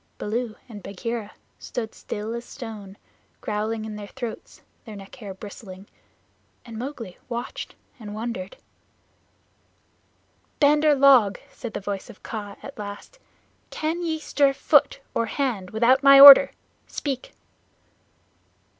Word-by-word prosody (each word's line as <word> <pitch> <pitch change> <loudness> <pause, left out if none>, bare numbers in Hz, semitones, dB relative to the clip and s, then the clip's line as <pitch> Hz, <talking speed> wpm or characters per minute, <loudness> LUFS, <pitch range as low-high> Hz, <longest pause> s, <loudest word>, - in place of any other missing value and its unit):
Baloo 225 +1 -3
and 215 -4 -10
Bagheera 210 +3 -5 0.3
stood 225 -2 -5
still 215 +2 -6
as 235 0 -5
stone, 215 -7 -10 0.4
growling 215 +1 -3
in 215 -1 -7
their 205 -1 -8
throats, 240 0 -8 0.2
their 220 -3 -10
neck 195 -1 -12
hair 210 -6 -8
bristling, 195 -1 -11 0.8
and 230 -2 -10
Mowgli 230 -6 -7
watched 240 0 -6 0.2
and 210 -2 -8
wondered. 215 -4 -5 2.0
"Bandar 300 0 +4
log," 265 -7 +5
said 235 -4 -8
the - - -2
voice 200 -1 -5
of - - -15
Kaa 205 -3 -6
at 275 -4 -10
last, 205 - -9 0.5
"can 320 +3 -3
ye 325 -2 -2
stir 285 -2 +1
foot 390 - +2
or 230 - 0
hand 220 -8 -2
without 240 +5 +3
my 275 -1 +8
order? 280 0 +12 0.4
Speak!" 270 -3 -5
225 Hz, 125 wpm, -24 LUFS, 205-270 Hz, 2.0 s, order